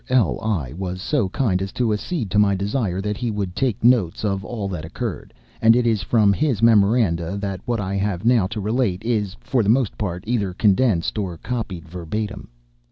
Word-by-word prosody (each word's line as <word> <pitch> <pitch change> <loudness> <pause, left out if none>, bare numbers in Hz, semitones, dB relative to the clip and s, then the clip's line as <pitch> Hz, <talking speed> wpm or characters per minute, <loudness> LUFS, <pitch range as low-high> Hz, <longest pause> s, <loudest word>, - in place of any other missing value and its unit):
L—l 110 - +1
was 90 -1 -4
so 115 0 0
kind 100 -5 0
as 95 0 -3
to 120 -3 +1
accede 110 - -3
to 105 - +3
my 100 -1 +4
desire 100 -1 -1
that 105 +1 -2
he 120 -1 -2
would 100 -4 -3
take 125 -7 -1
notes 115 -6 +3
of 95 -1 -1
all 105 -3 -4
that 90 -5 -5
occurred, 100 +6 -5 0.3
and 115 +1 +6
it 125 0 +2
is 110 -4 +2
from 105 0 +3
his 130 -4 0
memoranda 100 -5 +3
that 100 -2 -4
what 120 -2 0
I 100 0 -2 0.3
now 120 -1 +4
have 95 - -1
to 110 0 -4
relate 105 -2 0
is, 105 -5 -1
for 125 -2 +1
the 105 - 0
most 120 -1 +2
part, 90 -3 -3
either 105 -6 -1
condensed 105 -2 +2
or 90 -5 -3
copied 100 -8 -5
verbatim. 90 +5 -5
105 Hz, 195 wpm, -22 LUFS, 95-115 Hz, 0.3 s, and